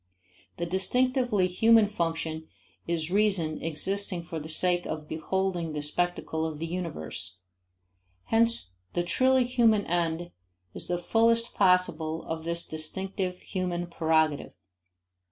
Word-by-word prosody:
The 170 - -1
distinctively 245 +3 +1
human 220 +5 +5
function 165 -4 -2 0.4
is 165 -1 -1
reason 195 -6 +1
existing 180 +3 -2
for 165 -1 -5
the 155 +1 -8
sake 175 +2 +1
of 155 -1 -5
beholding 175 0 -2
the 150 -1 -3
spectacle 160 0 -1
of 160 -2 -3
the 165 - -3
universe. 150 - -5 0.9
Hence 225 - +2 0.2
the 175 - +1
truly 260 +8 +3
human 235 -4 +3
end 170 0 -1 0.4
is - - -7
the 175 - 0
fullest 230 +5 +2
possible 170 -4 +2
of 160 0 -5
this 170 0 -1
distinctive 180 +4 -4
human 180 -2 -2
prerogative. 160 -3 +1
175 Hz, 120 wpm, -28 LUFS, 160-195 Hz, 0.9 s, human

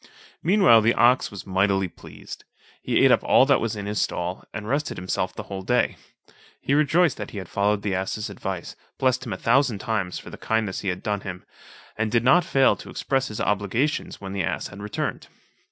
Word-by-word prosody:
Meanwhile, 180 - +5
the 115 +2 +3
ox 125 +2 +4
was 100 - -9
mightily 95 0 +1
pleased; - - -11 0.4
he - - +2
ate - - +6
up - - +4
all - - +5
that - - +3
was 115 -2 -2
in 100 -1 -5
his 105 +1 -1
stall, 90 +1 -3
and 105 -1 -6
rested 145 +5 -1
himself 90 0 -2
the - - -6
whole 95 -1 -6
day. 125 +6 +1 0.6
He 140 - -1
rejoiced 155 +2 +3
that 105 - -6
he - - -9
had 95 -3 -6
followed 100 +2 0
the 100 -2 -1
ass's 95 +3 -2
advice, 95 -3 -6 0.2
blessed 130 0 +1
him 110 - -3
a - - -4
thousand 125 -2 +2
times 105 -4 -2
for - - -10
the - - -10
kindness 110 -4 -1
he 100 - -6
had 90 0 -4
done 105 -2 -1
him, 90 -2 -7 0.5
and 110 0 -1
did 115 0 +2
not 170 +8 +5
fail 135 -5 +3
to - - -11
express 135 -1 -1
his 105 - -6
obligations 105 +8 -1
when 95 -1 -7
the 100 - -1
ass 80 - -2
had 100 +1 -10
returned. 105 0 -4
105 Hz, 210 wpm, -24 LUFS, 95-125 Hz, 0.6 s, ate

